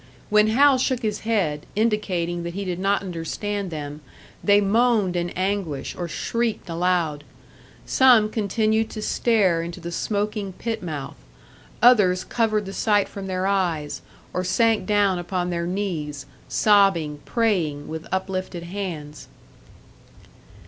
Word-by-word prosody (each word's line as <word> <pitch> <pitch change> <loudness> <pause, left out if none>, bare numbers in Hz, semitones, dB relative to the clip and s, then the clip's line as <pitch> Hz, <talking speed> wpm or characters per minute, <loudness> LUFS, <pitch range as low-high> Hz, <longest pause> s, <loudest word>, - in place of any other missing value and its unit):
When 210 0 +5
Hal 265 +4 +5
shook 255 -1 0
his 210 -1 -1
head, 185 -10 -1
indicating 190 -6 0
that 170 0 -5
he 200 0 -3
did 180 -1 -3
not 195 +1 +1
understand 195 +3 -4
them, 150 -2 -6 0.4
they 205 0 +5
moaned 210 -2 +2
in 175 0 -1
anguish, 185 -7 -2
or 175 - -4
shrieked 230 +5 -2
aloud. 170 -3 0 0.6
Some 245 -5 +5
continued 220 +1 +1
to 215 - -6
stare 200 -10 +2
into 170 +2 -6
the 170 0 -6
smoking 205 +1 -2
pit 225 +3 -4
mouth; 150 -6 -6 0.7
others 200 -7 +5
covered 215 -3 0
the 195 - -7
sight 205 -2 +2
from 195 -1 -7
their 185 0 -2
eyes, 175 -7 -1 0.3
or 180 - -1
sank 225 +4 +2
down 205 -3 +2
upon 180 0 -2
their 170 0 -2
knees, 160 -8 -3 0.2
sobbing, 195 -8 +3
praying 175 -11 0
with 160 0 -6
uplifted 185 -2 -3
hands. 170 -5 -6
190 Hz, 135 wpm, -23 LUFS, 170-210 Hz, 0.7 s, When